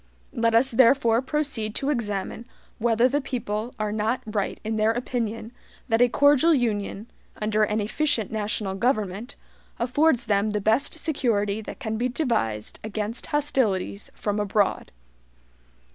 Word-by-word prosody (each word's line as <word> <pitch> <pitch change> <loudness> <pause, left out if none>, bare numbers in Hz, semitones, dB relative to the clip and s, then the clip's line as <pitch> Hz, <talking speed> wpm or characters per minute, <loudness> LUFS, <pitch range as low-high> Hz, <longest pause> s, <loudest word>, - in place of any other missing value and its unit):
Let 230 -1 +1
us 250 +3 +5
therefore 235 -1 +4
proceed 265 -6 -2
to 280 +2 0
examine 220 -2 -3 0.3
whether 235 +1 +3
the 285 +3 0
people 235 -3 -4
are 215 -1 -1
not 220 +4 -1
right 210 -2 -2
in 220 +1 -2
their 215 0 +2
opinion 230 -1 -2 0.4
that 225 +1 +3
a 245 - +6
cordial 290 +5 +5
Union, 215 -4 -1 0.3
under 215 0 0
an 210 0 +1
efficient 220 +1 0
national 210 -2 -2
government, 215 +1 -1 0.4
affords 255 +2 +2
them 205 0 +1
the 210 0 -1
best 225 +10 +1
security 220 -10 0
that - - -8
can 220 -5 -3
be 245 +3 0
devised 225 - -2
against 215 +1 -4
HOSTILITIES 240 -9 0
from 205 0 -2
abroad. 205 0 0
225 Hz, 140 wpm, -25 LUFS, 210-255 Hz, 0.4 s, a